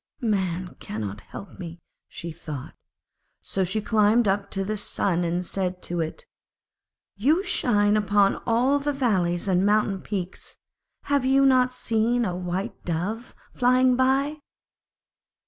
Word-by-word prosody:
'Man 185 -7 -1
cannot 105 -1 -5
help 200 - -11
me,' 170 -2 -7 0.3
she 170 - -7
thought. 155 -5 -8 0.7
So 190 - -1
she 195 +4 -1
climbed 215 +1 +3
up 195 +1 0
to 195 - -2
the 215 +2 -2
Sun 190 -3 0
and 175 +1 -1
said 180 -1 -3
to 175 0 -3
it, 160 - -5 0.9
'You 300 - +3
shine 210 - +2
upon 205 -1 +3
all 250 +5 +3
the 290 +1 -1
valleys 190 -10 0
and 185 -1 +2
mountain 205 -2 +2
peaks, 185 -3 -6 0.5
have 285 -2 +1
you 270 +1 +4
not 255 -1 +4
seen 235 0 0
a 180 -3 -2
White 180 +5 -4
Dove 190 +8 -3 0.2
flying 255 0 +4
by?' 270 +4 +1
205 Hz, 135 wpm, -25 LUFS, 180-250 Hz, 0.9 s, you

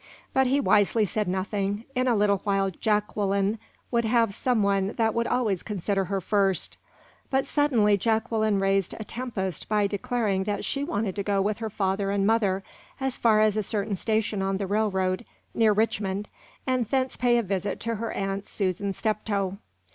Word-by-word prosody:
But 265 -1 +3
he 275 +3 +2
wisely 215 -3 +3
said 210 +1 -2
nothing; 200 +2 -1
in 255 0 +1
a 240 - +3
little 205 -1 +3
while 195 -1 +1
Jacqueline 205 +1 0 0.3
would 235 -1 +2
have 225 -2 +2
some 240 0 +1
one 200 0 +1
that 225 -1 +1
would 235 0 0
always 215 -8 0
consider 195 -1 -1
her 195 +2 -1
first. 195 0 0 0.5
But 265 0 +1
suddenly 245 -9 +3
Jacqueline 220 -1 +1
raised 195 -1 +1
a - - -4
tempest 210 -7 -4
by 210 -1 +2
declaring 200 -1 -1
that 205 -1 -2
she 280 - -1
wanted 215 - -2
to - - 0
go 200 0 0
with 205 +2 0
her 220 -1 -3
father 195 -1 -1
and 200 0 +1
mother 200 -3 +2 0.4
as 265 -1 -1
far 215 -2 +4
as 215 -1 +3
a 215 - +1
certain 205 0 -2
station 215 0 0
on 195 0 0
the 200 - -2
railroad, 190 -1 0 0.3
near 225 -2 +4
Richmond, 205 -2 0 0.4
and 255 -2 +1
thence 260 +1 0
to - - -11
pay 245 -1 +4
a 235 - +1
visit 195 0 -2
to 230 0 -1
her 230 +1 -3
Aunt 195 0 -3
Susan 195 0 -1
Steptoe. 200 -3 -1
210 Hz, 180 wpm, -26 LUFS, 195-225 Hz, 0.5 s, far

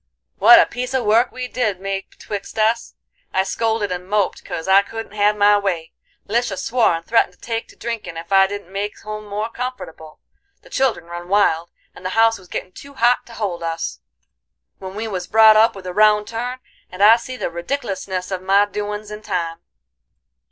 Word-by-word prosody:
what 240 - +9
a - - +6
piece 250 +2 -4
a 260 - +1
work 230 +3 +3
we 255 0 -5
did 220 -7 -1
make 195 0 -4
betwixt 205 0 -7
us! 225 +2 +1 0.4
I 190 - +2
scolded 220 0 -1
and 180 +1 -5
moped 205 -2 0
'cause 165 - -6
I 190 +1 +6
couldn't 225 +2 -8
have 210 0 +2
my 205 0 +5
way; 175 -5 -2 0.4
Lisha 225 -2 0
swore 230 -6 +2
and 165 0 -7
threatened 230 - +2
to - - -27
take 230 -1 -4
to - - -17
drinkin' 220 -7 -5
ef 170 +3 -9
I 195 0 +6
didn't 200 -2 -7
make 205 +1 -4
home 215 0 -7
more 210 +2 -3
comfortable; 230 -12 -7 0.4
the - - -18
children 265 -10 0
run 175 +1 -8
wild, 170 -4 +2 0.2
and - - -14
the 185 +4 -3
house 225 -1 +4
was 185 - -17
gittin' 185 - -5
too 280 +8 -13
hot 240 0 +2
to 235 - -12
hold 200 -7 -3
us, 165 - -3 0.8
when 190 0 -8
we 220 +2 -3
was 185 -4 -4
brought 220 0 +7
up 220 +1 +5
with 190 -1 -10
a 180 - -5
round 210 +1 +4
turn, 245 +2 -4 0.3
and 185 +2 -2
I 220 +2 +9
see 255 +2 -7
the 175 - -3
redicklousness 190 -1 -4
of 185 -1 -3
my 195 +2 +4
doin's 210 0 -5
in 210 0 -7
time. 175 -5 -3
205 Hz, 200 wpm, -20 LUFS, 185-225 Hz, 0.8 s, what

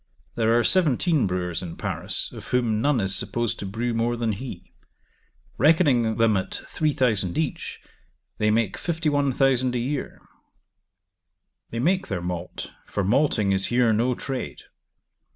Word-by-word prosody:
There 115 0 +2
are 120 - +3
seventeen 160 - +3
brewers 90 -2 -2
in 85 -3 -6
Paris, - - -3
of - - -9
whom 115 -4 +1
none 145 -1 +2
is 95 -1 -1
supposed 120 +3 -2
to 100 - -4
brew 115 +4 -2
more 115 +1 0
than 115 -1 0
he: 100 -4 -7 0.9
reckoning 135 - +4
them 115 -2 +4
at 95 - -2
3,000 125 - 0
each, 160 -3 -3 0.6
they 105 - +3
make 110 -2 +1
51,000 140 -6 +1
a - - +2
year. 130 +4 -3 1.5
They 115 - -5
make 185 +9 +1
their 95 -4 -2
malt, 90 0 -5 0.2
for 100 - -2
malting 110 -1 +2
is 95 0 +2
here 120 -2 +3
no 120 +3 +1
trade. 135 0 -5
120 Hz, 140 wpm, -25 LUFS, 105-135 Hz, 1.5 s, reckoning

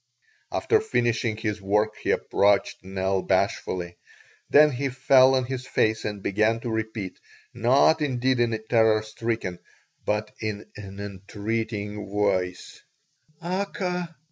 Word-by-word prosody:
After 440 -1 +2
finishing 120 - 0
his 105 -2 -3
work 105 +2 +1
he - - -3
approached 100 -2 +2
Nell 95 0 -1
bashfully; 90 -2 -1 0.5
then 150 +1 +7
he 135 +2 -2
fell 130 0 +5
on 130 - +2
his 130 0 -5
face 110 0 +1
and 105 -2 -4
began 110 +3 +2
to 120 - -4
repeat, 110 -4 -4 0.3
not 130 +7 +4
indeed 130 -3 +1
in 120 -1 +2
a 110 - 0
terror 110 -1 +2
stricken, 110 -5 -3 0.4
but 105 0 -1
in 105 -1 -4
an 100 -1 -9
entreating 105 +1 -4
voice: 95 -3 -1 0.6
"Aka! 180 -2 -3
110 Hz, 125 wpm, -25 LUFS, 100-125 Hz, 0.6 s, then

